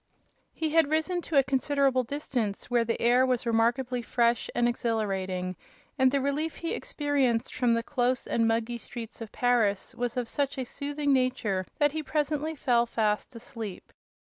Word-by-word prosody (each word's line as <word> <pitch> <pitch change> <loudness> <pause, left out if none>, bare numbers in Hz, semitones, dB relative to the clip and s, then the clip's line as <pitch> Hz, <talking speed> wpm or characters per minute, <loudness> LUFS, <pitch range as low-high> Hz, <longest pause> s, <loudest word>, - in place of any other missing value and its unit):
He 315 - -2
had 320 -2 +4
risen 320 +3 0
to 320 -3 -1
a 275 - +7
considerable 270 0 +2
distance, 245 -6 -3
where 240 -1 +4
the 230 0 -2
air 245 +2 +4
was 255 -2 +1
remarkably 240 +2 +1
fresh 235 0 +1
and 240 0 +3
exhilarating, 195 -6 -1 0.4
and 260 -2 +4
the 280 - +2
relief 285 +4 -1
he 335 - -3
experienced 285 - 0
from 245 -2 +2
the 230 - -1
close 250 -1 0
and 230 -1 +1
muggy 230 +1 0
streets 230 0 -8
of 225 - -7
Paris 230 -5 +1
was 245 0 -3
of 245 -2 -1
such 280 +3 -1
a 260 - -1
soothing 285 +2 -1
nature 250 -8 0
that 290 -1 +3
he 315 +1 -3
presently 300 +1 -1
fell 240 -4 +2
fast 215 +2 -1
asleep. 225 -4 -8
245 Hz, 170 wpm, -28 LUFS, 230-280 Hz, 0.4 s, a